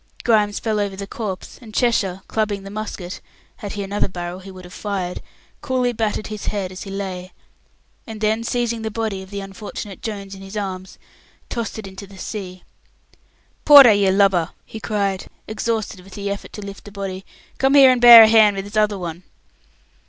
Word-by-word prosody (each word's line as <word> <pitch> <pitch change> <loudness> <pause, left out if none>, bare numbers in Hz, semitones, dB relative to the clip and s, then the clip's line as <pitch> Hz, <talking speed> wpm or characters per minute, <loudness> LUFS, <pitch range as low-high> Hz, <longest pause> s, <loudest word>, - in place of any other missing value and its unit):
Grimes 210 -3 +2
fell 220 -2 -1
over 200 -1 -2
the 200 +1 -6
corpse, 200 -2 -6
and 220 -3 -12
Cheshire, 195 -6 +1
clubbing 210 -3 -1
the 195 - -9
musket 205 -4 -6 0.4
had 205 - -6
he 205 - -4
another 200 +1 -1
barrel 175 0 -6
he 190 +1 -11
would 185 -1 -11
have 180 - -12
fired 190 -4 -4 0.4
coolly 255 -4 0
battered 215 -1 -2
his 215 -1 -6
head 195 -3 -2
as 185 - -9
he 195 - -7
lay, 190 -2 -5 0.7
and 220 -1 -7
then, 220 +1 0
seizing 235 -1 -1
the 220 - -3
body 220 -3 -3
of 190 - -12
the 200 0 -5
unfortunate 195 0 -8
Jones 200 -3 -6
in 195 - -10
his 195 +2 -8
arms, 190 -2 -5 0.5
tossed 230 -2 -4
it 220 - -7
into 195 +1 -10
the 195 0 -14
sea. 185 -2 -7 1.0
"Porter, 280 -6 +10
you 200 -1 +3
lubber!" 190 -3 +3 0.2
he 220 - -9
cried, 200 -3 -2 0.2
exhausted 215 -2 -2
with 185 +1 -14
the 200 -1 -3
effort 200 - -6
to 210 - -7
lift 200 0 -10
the 205 - -10
body, 195 -1 -5 0.4
"come 270 +1 +3
and 260 -3 +7
bear 235 -2 +12
a - - +7
hand 215 -2 +5
with 195 0 -4
this 205 +2 -10
other 210 -1 +2
one!" 170 -2 -6
200 Hz, 190 wpm, -21 LUFS, 190-220 Hz, 1.0 s, bear